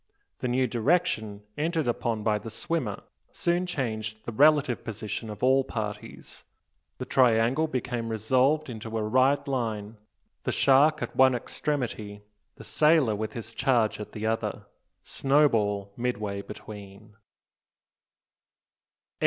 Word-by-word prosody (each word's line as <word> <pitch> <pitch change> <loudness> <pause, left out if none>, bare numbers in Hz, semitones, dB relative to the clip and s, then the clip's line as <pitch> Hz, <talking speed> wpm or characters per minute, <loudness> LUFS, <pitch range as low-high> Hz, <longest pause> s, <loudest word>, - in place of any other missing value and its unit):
The - - -2
new 130 +1 +2
direction 115 - 0 0.2
entered 160 -2 0
upon 115 -2 -1
by 105 -1 +1
the 115 - -8
swimmer 115 -1 -3 0.3
soon 175 +1 0
changed 110 -9 -4
the - - -4
relative 145 0 +4
position 110 0 -5
of 105 +2 -8
all 135 +1 +4
parties. 105 -4 -7 0.5
The - - -5
triangle 125 +4 +3
became 120 -4 -3
resolved 130 +8 +2
into 115 -2 -5
a 110 - -1
right 130 +6 +2
line, 110 -5 -3 0.4
the - - -2
shark 145 +3 +4
at - - -6
one 130 -1 +5
extremity, 115 -6 -4 0.3
the - - -12
sailor 150 -8 +3
with 110 +1 -4
his 115 -1 -7
charge 120 -4 +1
at 105 - -8
the 110 0 -4
other, 110 0 -2 0.4
Snowball 110 -9 +1
midway 105 -5 -2
between! 105 0 -11
115 Hz, 125 wpm, -27 LUFS, 110-135 Hz, 0.5 s, one